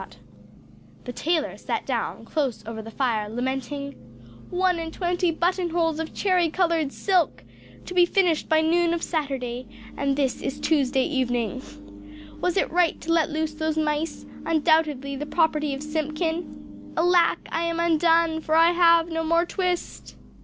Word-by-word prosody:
The 245 - -6
tailor 320 +3 -1
sat - - -3
down, - - -3
close 270 -9 -2
over 220 0 -6
the 220 - -9
fire, 225 -4 -1
lamenting 265 +4 -3 0.6
"One 360 -1 +1
and 325 -1 -5
twenty 355 0 0
button 350 +2 0
holes 325 -2 0
of 320 -1 -4
cherry 365 -4 +2
coloured 330 -4 +1
silk! 365 -2 0 0.4
To - - -7
be 355 -1 +5
finished 350 -4 +1
by 315 0 +4
noon 340 +1 +2
of 335 - -5
Saturday: 255 -6 -3 0.3
and 275 -1 0
this 270 -2 -1
is 270 - -4
Tuesday 270 -4 +2
evening. 245 - -1 0.8
Was 360 +1 0
it - - +1
right 350 -1 +2
to 330 - -1
let 330 -1 +2
loose 310 0 -2
those 315 0 -2
mice, 305 +1 -1 0.2
undoubtedly 310 -4 +1
the 295 +2 -5
property 300 -3 +1
of 275 - -7
Simpkin? 315 +2 -4
Alack, 345 +1 +3
I 335 +1 -1
am 335 0 -2
undone, 330 -1 +3
for 315 0 0
I 330 +1 +6
have 335 -1 +5
no 325 -1 -2
more 335 +2 +2
twist!" 360 -1 -3
320 Hz, 155 wpm, -24 LUFS, 280-340 Hz, 0.8 s, I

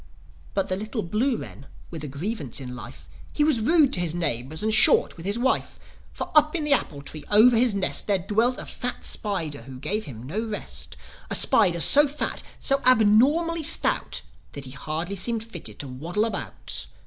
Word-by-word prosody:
But 195 - 0
the 185 - -1
little 215 +3 -4
blue 225 +8 -1
wren 140 - -10 0.2
with 160 -3 -7
a - - -5
grievance 145 - -5
in 125 -2 -8
life, 75 - -11 0.2
He 295 - 0
was 300 -6 +2
rude 290 +3 +3
to - - +1
his 170 -2 -2
neighbours 155 - -1
and 220 0 +1
short 215 - +5
with 170 +2 -8
his 205 +3 0
wife. 260 +2 -1 0.3
For, - - -7
up 305 +1 +4
in 325 - -1
the 295 -1 +3
apple 145 - -2
tree 150 +1 -7
over 225 +4 +6
his 230 -2 +2
nest, 195 - -1
There 200 -2 +3
dwelt 225 +7 0
a - - -6
fat 245 - -5
spider 165 - -2
who 130 +2 -11
gave 205 +11 -3
him 120 -4 -10
no 155 +12 -4
rest: 215 -2 -6 0.3
A - - 0
spider 180 -6 +4
so 290 - +7
fat, 290 +2 -4 0.2
so 275 0 0
abnormally 255 +9 +3
stout 315 +2 +2 0.3
That 140 -1 -5
he 130 - -7
seemed 135 - -10
hardly 165 +5 -3
fitted 205 - -3
to 145 - -7
waddle 165 +12 -3
about. 225 - -5
205 Hz, 195 wpm, -24 LUFS, 155-245 Hz, 0.3 s, so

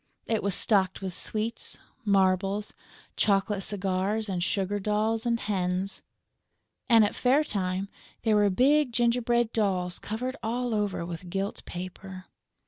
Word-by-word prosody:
It 225 -2 0
was 200 -2 0
stocked 190 -3 +2
with 190 -2 -3
sweets, 220 +5 -2 0.3
marbles, 195 0 +1 0.4
chocolate 200 0 +1
cigars 200 +2 -1
and 180 -2 -1
sugar 195 +2 -1
dolls 215 +3 0
and 235 -1 +1
hens; 190 -1 -2 0.9
and, 225 -3 +7
at 205 - -2
fair 265 +4 +3
time, 190 -5 -2 0.4
there 220 -2 +3
were 205 -1 +4
big 265 +6 +3
gingerbread 240 0 +2
dolls 185 -5 0
covered 250 +5 -4
all 240 +1 -1
over 205 -5 -1
with 175 +1 -7
gilt 195 +2 -3
paper. 185 +1 -8
205 Hz, 135 wpm, -28 LUFS, 190-225 Hz, 0.9 s, and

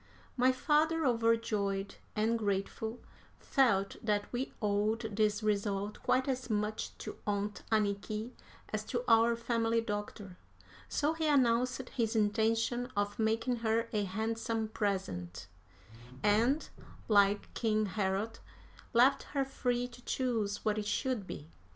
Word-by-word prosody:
My 255 +1 +4
father, 310 +4 +2
overjoyed 225 -5 +1 0.2
and 225 +2 +1
grateful, 210 +3 -2 0.4
felt 200 -8 +2
that 210 0 0
we 250 +2 -2
owed 215 +1 0
this 210 0 +1
result 205 -1 -1
quite 260 +1 +2
as 255 -2 -2
much 210 0 -2
to - - -7
Aunt 205 0 -1
Anniky 215 +2 0 0.4
as 215 0 -1
to 240 +2 -2
our 230 0 +5
family 230 -1 +1
doctor, 205 -3 -5 0.5
so 300 +2 +1
he 320 -1 -1
announced 255 -2 +2
his 230 -2 -1
intention 225 +3 +1
of 205 +1 -1
making 225 +3 +1
her 230 0 0
a 210 -1 +1
handsome 220 +2 -2
present, 100 - -2 0.8
and, 230 +9 +3 0.4
like 205 -1 +3
King 215 -2 +1
Herod, 200 +2 -1 0.5
left 250 +4 +5 0.2
her 275 - +3
free 245 -2 -1
to 245 0 -14
choose 230 -6 -1
what 215 0 +1
it 205 - -4
should 210 -1 -1
be. 145 - -7
220 Hz, 125 wpm, -32 LUFS, 205-240 Hz, 0.8 s, our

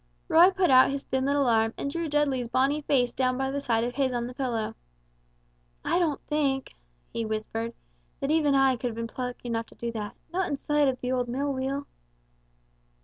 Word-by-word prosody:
Roy 345 +3 +7
put 380 -4 +2
out 255 0 +7
his 275 0 -3
thin 265 0 -1
little 280 0 +2
arm 225 -1 +2
and 280 - -3
drew 335 0 -2
Dudley's 280 -4 +1
bonny 270 +5 +1
face 255 -4 +2
down 255 -1 +1
by 265 0 -1
the 280 +1 -2
side 230 -4 +1
of 245 +1 -2
his 260 -1 0
on 240 -1 -1
the 250 - -6
pillow. 240 -4 -2 1.1
"I - - +2
don't 315 -5 +1
think," 280 -3 0 0.4
he 230 - -2
whispered, 225 +1 -3 0.4
"that 275 - -1
even 300 -3 +3
I 270 -2 +4
could 245 - -2
have 230 - -4
been 230 0 -3
plucky 250 +1 -5
enough 230 -1 -2
to - - -18
do 235 0 -4
that 210 -2 -5 0.2
not 375 0 0
in 285 - 0
sight 295 0 +2
of 255 -1 0
that 250 - -3
old 250 -1 0
mill 275 +3 -1
wheel!" 270 +2 -2
265 Hz, 205 wpm, -27 LUFS, 240-285 Hz, 1.1 s, Roy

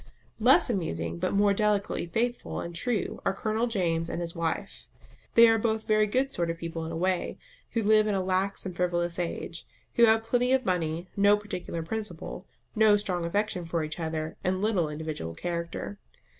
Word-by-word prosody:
Less 245 +5 +6
amusing 85 - -2
but - - 0
more 200 0 +4
delicately 205 -3 0
faithful 240 +7 -2
and 170 - -5
true 215 +5 -2
are - - 0
Colonel 220 +3 0
James 170 -7 0
and - - -3
his 170 -1 -4
wife. 165 -1 -3 0.5
They 230 0 +9
are 225 0 +4
both 220 0 0
very 215 0 +4
good 260 +6 +1
sort 170 -9 -1
of 165 - -2
people 165 0 -5
in - - -5
a 165 - -3
way, 185 +1 0 0.4
who 230 - +1
live 215 +1 +5
in 210 - +1
a 190 - 0
lax 190 +2 -1
and 185 -2 -5
frivolous 175 -1 0
age, 170 -1 -4 0.3
who 235 - +6
have 220 0 +4
plenty 245 +2 +2
of 265 -1 +2
money, 170 -1 -1
no 205 +1 +5
particular 180 -5 -5
principle, 215 +5 -5 0.3
no 215 -1 +6
strong 180 -4 -2
affection 200 +1 -1
for 165 -1 -1
each 155 +2 -5
other, 160 -1 -3
and 185 +1 0
little 195 -6 +1
individual 150 - -5
character. 170 - -4
185 Hz, 185 wpm, -28 LUFS, 170-215 Hz, 0.5 s, They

